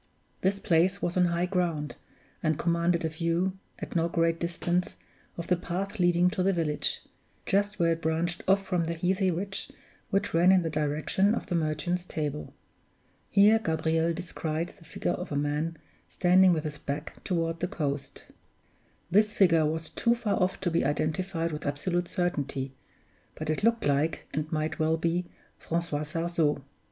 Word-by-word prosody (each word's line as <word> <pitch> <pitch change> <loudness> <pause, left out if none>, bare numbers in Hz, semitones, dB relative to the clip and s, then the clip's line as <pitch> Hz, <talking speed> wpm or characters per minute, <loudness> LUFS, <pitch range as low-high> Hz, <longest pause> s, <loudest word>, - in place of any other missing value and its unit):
This 195 +1 +2
place 185 +1 +2
was 175 -3 -2
on 180 -1 +4
high 170 0 +1
ground, 175 -5 -1 0.5
and 155 -2 +1
commanded 170 0 +1
a - - +1
view, 170 +4 -1 0.2
at - - -7
no 170 0 +2
great 165 -1 +1
distance, 175 +1 -1 0.4
of 170 - -4
the 180 - +3
path 190 +4 -4
leading 175 0 +4
to 200 -2 -1
the 195 +2 +3
village, 160 -5 0 0.4
just 205 +2 +1
where 170 -1 +3
it 165 0 -1
branched 165 +2 -1
off 195 +1 +3
from 175 -3 0
the 170 +1 -2
heathy 185 +3 +1
ridge 195 +3 -3 0.4
which 200 +1 0
ran 175 +3 +6
in 185 -2 +5
the 165 - -2
direction 155 +7 +1
of - - -4
the 190 - -4
Merchant's 170 +2 0
Table. 150 -4 -4 0.8
Here 210 +2 +6
Gabriel 160 -2 +1
descried 165 -1 -3
the 165 - -18
figure - - -2
of - - -4
a - - -1
man 150 +3 -1 0.3
standing 185 +1 +5
with 160 -3 +1
his 150 -1 -5
back 145 +3 -5
toward 165 -2 -1
the 180 - 0
coast. 145 -8 -4 0.9
This 210 +3 +4
figure 165 -5 +5
was 160 +1 -3
too 235 0 +2
far 215 -5 -1
off 185 +1 +1
to 180 -2 0
be 165 - +2
identified 165 +4 -1
with 150 0 -5
absolute 175 +5 -1
certainty, 140 -7 -2 0.6
but 155 0 -2
it 155 - -2
looked 230 +1 +2
like, 145 +3 +1
and 155 +1 -2
might 155 0 -1
well 160 +1 +2
be, 170 +2 0 0.3
Francois 165 -3 -2
Sarzeau. 165 -2 0
170 Hz, 170 wpm, -28 LUFS, 155-180 Hz, 0.9 s, ran